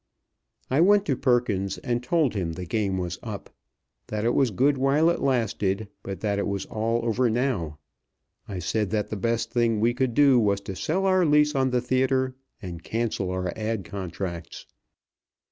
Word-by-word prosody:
I 140 Hz, +4 st, +4 dB
went 205 Hz, +3 st, +5 dB
to 135 Hz, -, +1 dB
Perkins 115 Hz, -7 st, +1 dB
and 120 Hz, 0 st, -2 dB
told 150 Hz, +1 st, +1 dB
him 90 Hz, -6 st, -2 dB
the 90 Hz, +1 st, -6 dB
game 100 Hz, 0 st, -1 dB
was 90 Hz, +1 st, -3 dB
up 105 Hz, -4 st, -7 dB, 0.6 s
that 105 Hz, 0 st, -3 dB
it 120 Hz, -, +2 dB
was 135 Hz, -3 st, +3 dB
good 135 Hz, +8 st, +2 dB
while 145 Hz, +5 st, +3 dB
it -, -, -3 dB
lasted, 110 Hz, -5 st, 0 dB
but 95 Hz, -1 st, -6 dB
that 100 Hz, -2 st, 0 dB
it -, -, -1 dB
was 100 Hz, -1 st, -2 dB
all 115 Hz, +2 st, -1 dB
over 120 Hz, +2 st, +2 dB
now. 110 Hz, -, -1 dB, 0.7 s
I 100 Hz, -4 st, -5 dB
said 105 Hz, +4 st, -1 dB
that 105 Hz, 0 st, -1 dB
the -, -, -1 dB
best 115 Hz, +2 st, -1 dB
thing 115 Hz, -3 st, +1 dB
we 115 Hz, +3 st, +2 dB
could 125 Hz, -1 st, -1 dB
do 140 Hz, -4 st, +6 dB
was 100 Hz, -3 st, +2 dB
to 95 Hz, -1 st, -6 dB
sell 185 Hz, -, -1 dB
our 185 Hz, -1 st, +4 dB
lease 150 Hz, -1 st, +4 dB
on 135 Hz, -2 st, +2 dB
the 125 Hz, -1 st, +1 dB
theatre 130 Hz, +1 st, +1 dB, 0.3 s
and 85 Hz, -3 st, -6 dB
cancel 110 Hz, -4 st, -2 dB
our 90 Hz, -1 st, -2 dB
ad. 110 Hz, -3 st, -3 dB
contracts. 90 Hz, -3 st, -6 dB
115 Hz, 180 wpm, -25 LUFS, 100-130 Hz, 0.7 s, do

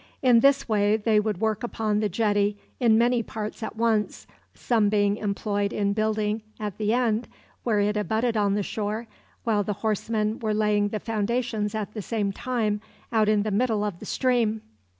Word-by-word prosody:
In 245 Hz, -3 st, +6 dB
this 275 Hz, +3 st, +4 dB
way 210 Hz, -1 st, +2 dB
they 215 Hz, 0 st, +2 dB
could 210 Hz, -4 st, -2 dB
work 220 Hz, 0 st, 0 dB
upon 220 Hz, -3 st, -1 dB
the 210 Hz, -1 st, 0 dB
jetty 205 Hz, 0 st, +1 dB, 0.2 s
in 230 Hz, -4 st, +4 dB
many 240 Hz, +1 st, +3 dB
parts 215 Hz, 0 st, -6 dB
at 220 Hz, -, -5 dB
once, 220 Hz, -2 st, 0 dB, 0.3 s
some 220 Hz, -4 st, +2 dB
being 205 Hz, -1 st, +2 dB
employed 205 Hz, 0 st, -1 dB
in 200 Hz, -1 st, 0 dB
building 215 Hz, 0 st, 0 dB, 0.2 s
at 210 Hz, -2 st, -5 dB
the 210 Hz, 0 st, +1 dB
end 235 Hz, -1 st, +1 dB, 0.4 s
where 220 Hz, -4 st, +1 dB
it 205 Hz, +1 st, +1 dB
abutted 220 Hz, +3 st, 0 dB
on 200 Hz, -2 st, +2 dB
the 205 Hz, -, 0 dB
shore, 215 Hz, +3 st, -3 dB, 0.4 s
while 215 Hz, -3 st, +1 dB
the 210 Hz, -, -2 dB
horsemen 215 Hz, 0 st, 0 dB
were 215 Hz, -2 st, -1 dB
laying 210 Hz, -1 st, +2 dB
the 210 Hz, +1 st, -3 dB
foundations 220 Hz, -1 st, -1 dB
at 210 Hz, -1 st, -4 dB
the 215 Hz, -, -4 dB
same 205 Hz, -1 st, -1 dB
time 220 Hz, -3 st, -1 dB, 0.3 s
out 220 Hz, -2 st, +3 dB
in 210 Hz, -1 st, +3 dB
the 215 Hz, -, -2 dB
middle 220 Hz, 0 st, +1 dB
of 205 Hz, -5 st, -3 dB
the -, -, -9 dB
stream. 235 Hz, -4 st, +1 dB
215 Hz, 185 wpm, -25 LUFS, 205-225 Hz, 0.4 s, In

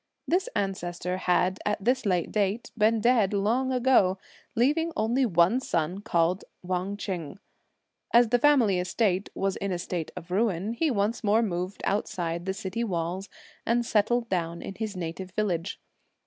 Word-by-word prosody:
This 370 Hz, +8 st, +1 dB
ancestor 180 Hz, -2 st, -2 dB
had, 185 Hz, 0 st, +1 dB
at 210 Hz, -1 st, -2 dB
this 250 Hz, +2 st, +3 dB
date, 200 Hz, +3 st, 0 dB
been 220 Hz, 0 st, +3 dB
dead 225 Hz, -4 st, +3 dB
long 230 Hz, +6 st, +1 dB
ago, 250 Hz, -7 st, +3 dB, 0.4 s
leaving 300 Hz, +8 st, +2 dB
only 240 Hz, +4 st, +2 dB
one 175 Hz, +5 st, +3 dB
son 175 Hz, -4 st, -2 dB
called 180 Hz, -3 st, +1 dB, 0.2 s
Wang 185 Hz, +2 st, -2 dB
Ch'eng. 180 Hz, -5 st, -5 dB, 0.7 s
As 235 Hz, -1 st, +5 dB
the 245 Hz, +1 st, +3 dB
family 240 Hz, -10 st, +4 dB
estate 190 Hz, +1 st, 0 dB
was 195 Hz, 0 st, -1 dB
in 200 Hz, 0 st, -3 dB
a 180 Hz, -, -1 dB
state 175 Hz, -2 st, -4 dB
of 180 Hz, -1 st, -9 dB
ruin, 200 Hz, 0 st, 0 dB
he 315 Hz, +6 st, +1 dB
once 225 Hz, 0 st, 0 dB
more 215 Hz, +2 st, +3 dB
moved 185 Hz, -1 st, -3 dB
outside 175 Hz, -3 st, -2 dB
the 190 Hz, -, 0 dB
city 195 Hz, +3 st, -3 dB
walls 180 Hz, -1 st, -3 dB, 0.3 s
and 235 Hz, +1 st, +1 dB
settled 230 Hz, +2 st, +1 dB
down 170 Hz, -4 st, -2 dB
in -, -, -6 dB
his 215 Hz, -2 st, -5 dB
native 180 Hz, +2 st, -5 dB
village. 185 Hz, -4 st, -1 dB
200 Hz, 155 wpm, -27 LUFS, 180-230 Hz, 0.7 s, As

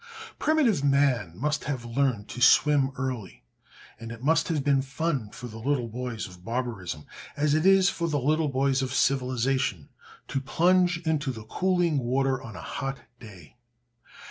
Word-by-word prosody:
Primitive 270 Hz, -, +2 dB
man 135 Hz, -, +2 dB
must 150 Hz, +6 st, -1 dB
have 130 Hz, -5 st, -3 dB
learned 120 Hz, -3 st, 0 dB
to 125 Hz, -, -7 dB
swim 140 Hz, +2 st, +5 dB
early, 125 Hz, -, -5 dB, 0.6 s
and 115 Hz, 0 st, -8 dB
it 115 Hz, +1 st, -9 dB
must 160 Hz, +2 st, +2 dB
have 155 Hz, -5 st, -1 dB
been 140 Hz, -1 st, +3 dB
fun 135 Hz, -4 st, -2 dB
for 125 Hz, -, -10 dB
the 110 Hz, -2 st, -8 dB
little 125 Hz, 0 st, 0 dB
boys 120 Hz, -1 st, -4 dB
of 90 Hz, -1 st, -15 dB
barbarism, 115 Hz, -10 st, -4 dB, 0.3 s
as 145 Hz, 0 st, +2 dB
it 155 Hz, +4 st, +3 dB
is 195 Hz, -1 st, +6 dB
for 170 Hz, -3 st, -2 dB
the 145 Hz, -2 st, 0 dB
little 155 Hz, +3 st, +1 dB
boys 135 Hz, 0 st, +1 dB
of 130 Hz, -, -3 dB
civilization, 130 Hz, -, 0 dB, 0.4 s
to 135 Hz, -, -2 dB
plunge 175 Hz, +4 st, +3 dB
into 150 Hz, -3 st, 0 dB
the 110 Hz, -3 st, -8 dB
cooling 175 Hz, +3 st, +1 dB
water 130 Hz, +1 st, 0 dB
on 110 Hz, -3 st, -9 dB
a -, -, -8 dB
hot 135 Hz, 0 st, -4 dB, 0.2 s
day. 100 Hz, -4 st, -14 dB
135 Hz, 165 wpm, -27 LUFS, 120-150 Hz, 0.6 s, is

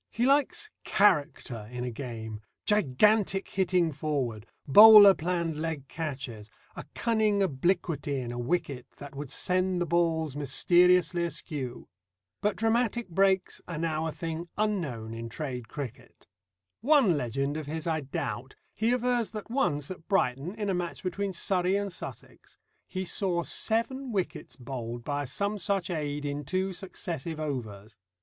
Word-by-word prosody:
He 235 Hz, -, 0 dB
likes 295 Hz, +11 st, +2 dB
"character" 145 Hz, -, +1 dB
in 125 Hz, 0 st, -4 dB
a 125 Hz, -, -3 dB
game, 110 Hz, -3 st, -6 dB, 0.2 s
gigantic 210 Hz, -, +3 dB
hitting 180 Hz, -3 st, +1 dB
forward, 135 Hz, -8 st, -3 dB, 0.2 s
bowler 205 Hz, +5 st, +10 dB
planned 170 Hz, -2 st, -2 dB
leg 155 Hz, -3 st, -3 dB
catches, 130 Hz, -9 st, -5 dB, 0.3 s
a -, -, -7 dB
cunning 215 Hz, -3 st, +2 dB
obliquity 150 Hz, -3 st, 0 dB
in 120 Hz, -2 st, -4 dB
a 120 Hz, -, -5 dB
wicket 135 Hz, -2 st, -2 dB
that 145 Hz, -1 st, -10 dB
would 140 Hz, -1 st, -6 dB
send 185 Hz, +3 st, 0 dB
the 175 Hz, -, +1 dB
balls 160 Hz, -3 st, +1 dB
mysteriously 175 Hz, +4 st, +3 dB
askew. 150 Hz, -6 st, -5 dB, 0.5 s
But 210 Hz, 0 st, +1 dB
dramatic 230 Hz, -1 st, 0 dB
breaks 190 Hz, +1 st, +1 dB
are 170 Hz, -, -5 dB
now 160 Hz, 0 st, -1 dB
a -, -, -2 dB
thing 165 Hz, +2 st, -5 dB
unknown 155 Hz, -, -2 dB
in 115 Hz, 0 st, -6 dB
trade 125 Hz, -3 st, -5 dB
cricket. 130 Hz, -1 st, -8 dB, 0.5 s
One 255 Hz, -, +4 dB
legend 135 Hz, +2 st, -1 dB
of 155 Hz, -2 st, -5 dB
his 160 Hz, +1 st, -4 dB
I 160 Hz, -2 st, 0 dB
doubt; 135 Hz, -3 st, -5 dB, 0.2 s
he 225 Hz, +2 st, +1 dB
avers 245 Hz, -2 st, +1 dB
that 215 Hz, +1 st, -8 dB
once 150 Hz, -, 0 dB
at 175 Hz, -3 st, -9 dB
Brighton, 165 Hz, -, 0 dB
in 210 Hz, -2 st, -3 dB
a 195 Hz, -, +1 dB
match 175 Hz, -1 st, -3 dB
between 195 Hz, +2 st, -2 dB
Surrey 185 Hz, +1 st, +1 dB
and 200 Hz, -2 st, -2 dB
Sussex, -, -, -10 dB, 0.3 s
he 185 Hz, 0 st, -4 dB
saw 175 Hz, -2 st, 0 dB
seven 245 Hz, +7 st, -1 dB
wickets 190 Hz, -5 st, -3 dB
bowled 120 Hz, -2 st, -6 dB
by 145 Hz, +1 st, -2 dB
some 200 Hz, +10 st, -2 dB
such 195 Hz, -3 st, -1 dB
aid 145 Hz, -3 st, -3 dB
in 145 Hz, 0 st, -3 dB
two 185 Hz, +5 st, -1 dB
successive 170 Hz, -4 st, -5 dB
overs. 110 Hz, -8 st, -5 dB
165 Hz, 145 wpm, -28 LUFS, 140-195 Hz, 0.5 s, bowler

